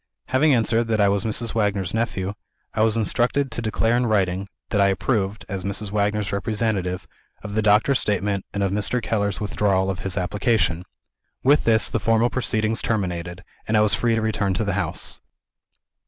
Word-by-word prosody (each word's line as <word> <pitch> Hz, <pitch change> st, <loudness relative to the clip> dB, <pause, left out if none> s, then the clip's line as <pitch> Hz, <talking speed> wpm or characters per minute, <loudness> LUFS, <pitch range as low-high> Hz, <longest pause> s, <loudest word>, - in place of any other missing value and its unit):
Having 140 Hz, +2 st, +4 dB
answered 115 Hz, 0 st, +2 dB
that 110 Hz, -1 st, 0 dB
I 100 Hz, -1 st, +4 dB
was 100 Hz, +2 st, 0 dB
Mrs. 115 Hz, +1 st, -2 dB
Wagner's 100 Hz, -4 st, 0 dB
nephew, 100 Hz, -4 st, -1 dB, 0.4 s
I 110 Hz, -, 0 dB
was 110 Hz, 0 st, +3 dB
instructed 125 Hz, +5 st, +1 dB
to -, -, -3 dB
declare 115 Hz, +1 st, +1 dB
in 120 Hz, 0 st, +1 dB
writing, 95 Hz, -3 st, 0 dB, 0.2 s
that 105 Hz, -, +2 dB
I 100 Hz, -, +5 dB
approved 100 Hz, +1 st, -1 dB
(as 95 Hz, -1 st, -4 dB
Mrs. 100 Hz, +1 st, -3 dB
Wagner's 105 Hz, -1 st, 0 dB
representative) 100 Hz, -3 st, -1 dB, 0.4 s
of 105 Hz, -1 st, -6 dB
the 110 Hz, -, +1 dB
doctor's 110 Hz, +6 st, +4 dB
statement 100 Hz, -1 st, -1 dB
and 100 Hz, -, -2 dB
of 95 Hz, -, 0 dB
Mr. 105 Hz, +5 st, 0 dB
Keller's 100 Hz, -4 st, -1 dB
withdrawal 95 Hz, -2 st, +1 dB
of 95 Hz, -, -6 dB
his 95 Hz, 0 st, -4 dB
application. 90 Hz, -2 st, 0 dB, 0.6 s
With 145 Hz, +3 st, +4 dB
this, 110 Hz, -1 st, +4 dB
the -, -, -1 dB
formal 115 Hz, +1 st, +2 dB
proceedings 110 Hz, -3 st, 0 dB
terminated, 90 Hz, -5 st, -2 dB, 0.2 s
and 110 Hz, -, +2 dB
I -, -, +5 dB
was 105 Hz, -1 st, +3 dB
free 115 Hz, -1 st, +2 dB
to 115 Hz, -, 0 dB
return 100 Hz, -3 st, 0 dB
to 110 Hz, -, 0 dB
the 100 Hz, -2 st, -1 dB
house. 100 Hz, -, -3 dB
105 Hz, 185 wpm, -23 LUFS, 95-115 Hz, 0.6 s, I